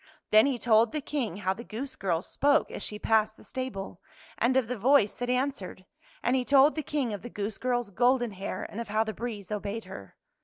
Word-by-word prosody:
Then 215 +5 +7
he 270 -3 0
told 225 0 +4
the 305 - 0
King 265 - -3
how 190 - +3
the 235 - -9
goose 260 +4 -5
girl 175 -3 -1
spoke 290 +2 +2
as - - -6
she 210 - -3
passed 215 0 +2
the - - -15
stable, 200 -9 -5 0.4
and 255 +3 +3
of 255 -4 +2
the 250 - -2
voice 240 -1 +3
that 245 0 -2
answered. 250 -8 -2 0.4
And 245 - +2
he 255 - +1
told 280 +3 +5
the 310 - -2
King 280 -6 -2
of 205 - -5
the 240 - -8
goose 210 -1 -4
girl's 245 -3 -1
golden 245 +2 +2
hair, 195 0 -5
and 225 - -6
of 235 - -6
how 215 +2 +1
the 220 -1 -4
breeze 215 -5 -6
obeyed 210 +1 -3
her. 100 - -10
230 Hz, 225 wpm, -28 LUFS, 205-260 Hz, 0.4 s, Then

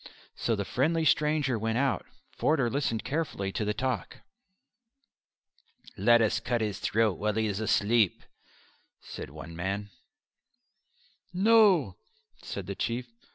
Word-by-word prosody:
So 115 - 0
the 100 -1 -3
friendly 160 - +1
stranger 150 -5 +2
went 115 +1 -1
out. 135 0 0 0.2
Forder 135 -7 +1
listened 125 -5 -1
carefully 140 -11 -2
to 105 - -2
the 105 - 0
talk. 130 +2 -3 1.7
"Let 115 +3 +5
us 110 +1 +1
cut 120 +1 -1
his 105 -3 -2
throat 110 -4 +1
while 105 0 0
he 110 0 +1
is 100 -1 -2
asleep," 110 -1 +2 0.8
said - - -8
one 80 +3 -10
man. 100 +4 -3 1.4
"No," 190 - +4 0.4
said 100 - -6
the 100 - -4
Chief. 120 +5 -2
115 Hz, 125 wpm, -28 LUFS, 100-140 Hz, 1.7 s, Let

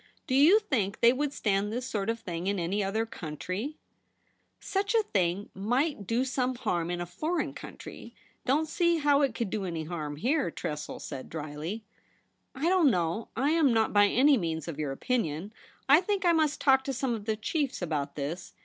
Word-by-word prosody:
Do 255 - -3
you 300 +10 +7
think 240 - -1
they 235 +1 +7
would 285 +2 -1
stand 205 -5 0
this 245 +3 -3
sort 210 -4 -2
of 230 0 -1
thing 175 -4 -5
in 200 0 +1
any 190 +4 0
other 215 +4 0
country 185 - -5 0.3
?' - - -43
' - - -45
Such 400 +3 -1
a 445 - +4
thing 190 - -1
might 245 - -1
do 240 +3 +1
some 255 -1 -1
harm 175 -8 -1
in 175 0 -2
a 175 - -2
foreign 310 - -2
country; - - -10 0.3
don't 300 +5 +1
see 340 0 +2
how 290 -2 +3
it 270 -5 +1
could 225 -5 -2
do 210 - -2
any 165 -4 -3
harm 155 -3 -4
here,' 250 - +1
Tressel 150 -2 -5
said 135 -3 -7
drily. 155 +7 -5 0.4
' - - -43 0.3
I 280 +5 -1
don't 355 -5 +5
know. 175 +1 0
I 275 +5 +1
am 315 -5 +4
not 225 -1 +2
by 205 0 +6
any 270 +6 +5
means 160 -3 -3
of 160 -3 -5
your 150 -3 -1
opinion. 190 - -2 0.3
I 290 +5 +7
think 395 0 -1
I 345 - +6
must 310 -2 +2
talk 265 -1 +4
to 275 - -2
some 255 -1 -1
of 215 -3 -5
the 220 -1 0
chiefs 275 +5 -2
about 155 -5 -2
this. 155 +5 -5
225 Hz, 205 wpm, -29 LUFS, 175-280 Hz, 0.4 s, you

